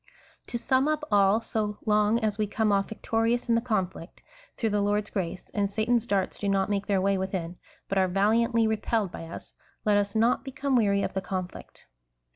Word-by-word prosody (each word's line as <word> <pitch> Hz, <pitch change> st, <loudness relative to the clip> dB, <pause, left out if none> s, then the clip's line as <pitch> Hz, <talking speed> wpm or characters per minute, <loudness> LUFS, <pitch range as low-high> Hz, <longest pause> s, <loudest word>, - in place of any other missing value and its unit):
To 235 Hz, -, -3 dB
sum 260 Hz, +3 st, +1 dB
up 305 Hz, 0 st, 0 dB
all, 200 Hz, +2 st, +4 dB
so 210 Hz, -2 st, -2 dB
long 210 Hz, +1 st, +3 dB
as 215 Hz, -1 st, -1 dB
we 210 Hz, -, +1 dB
come 215 Hz, +1 st, 0 dB
off 195 Hz, -1 st, +1 dB
victo 225 Hz, +1 st, -4 dB
rious 235 Hz, +2 st, +1 dB
in 235 Hz, -, +3 dB
the 230 Hz, -, +3 dB
conflict, 190 Hz, -7 st, -3 dB, 0.3 s
through 225 Hz, -2 st, 0 dB
the 205 Hz, 0 st, +1 dB
Lord's 205 Hz, +1 st, 0 dB
grace, 185 Hz, -2 st, -4 dB
and 200 Hz, -1 st, 0 dB
Satan's 235 Hz, +2 st, +1 dB
darts 195 Hz, -3 st, -1 dB
do 200 Hz, -, -1 dB
not 195 Hz, 0 st, +1 dB
make 200 Hz, -1 st, -1 dB
their 200 Hz, -2 st, +2 dB
way 195 Hz, 0 st, +1 dB
within, 185 Hz, -2 st, -3 dB, 0.3 s
but 195 Hz, -, 0 dB
are 190 Hz, -, +3 dB
valiantly 225 Hz, +5 st, +2 dB
re 220 Hz, 0 st, +1 dB
pelled 210 Hz, -3 st, -1 dB
by 165 Hz, -, -7 dB
us, 165 Hz, -, -10 dB, 0.3 s
let 210 Hz, -1 st, +4 dB
us 205 Hz, +1 st, -1 dB
not 230 Hz, +3 st, +2 dB
become 275 Hz, 0 st, -2 dB
weary 200 Hz, -4 st, +3 dB
of -, -, -3 dB
the 190 Hz, -, -1 dB
conflict. 185 Hz, -1 st, -6 dB
210 Hz, 210 wpm, -27 LUFS, 195-225 Hz, 0.3 s, all